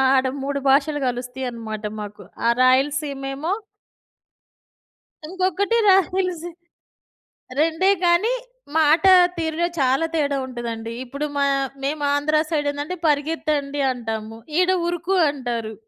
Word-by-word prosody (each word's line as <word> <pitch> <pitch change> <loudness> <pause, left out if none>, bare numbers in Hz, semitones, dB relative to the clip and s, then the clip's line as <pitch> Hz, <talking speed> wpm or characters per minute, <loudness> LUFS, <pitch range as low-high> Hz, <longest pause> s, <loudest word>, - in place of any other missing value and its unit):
ఆడ 260 0 +3 0.2
3 280 0 -2
భాషలు 290 +2 +3
గలుస్తయనమాట 245 -3 -5 0.2
మాకు. 205 0 -9 0.2
ఆ - - +5
రాయలసీమేమో 275 +3 +1 1.8
ఇంకొకటి 375 +5 0
రాయలసీ 365 -3 +2 1.1
రెండే 325 +4 +2
గానీ 350 +7 +3 0.4
మాట 315 +1 +4 0.4
తీరులో 330 +1 -1
చాలా 270 +3 +2
తేడా 285 -3 +1
వుంటదండి. 235 -3 -5
ఇప్పుడు 280 +4 -4
మా 280 - +2 0.4
మేమాంధ్ర 290 +1 0 0.2
సైడేందంటే 290 +2 -1
పరిగెత్తండి 290 -1 0
అంటాము. 225 -2 -5 0.2
ఈడ 365 0 +3 0.2
ఉరుకు 350 +2 -1
అంటారు. 240 -6 -4
285 Hz, 95 wpm, -22 LUFS, 255-325 Hz, 1.8 s, ఆ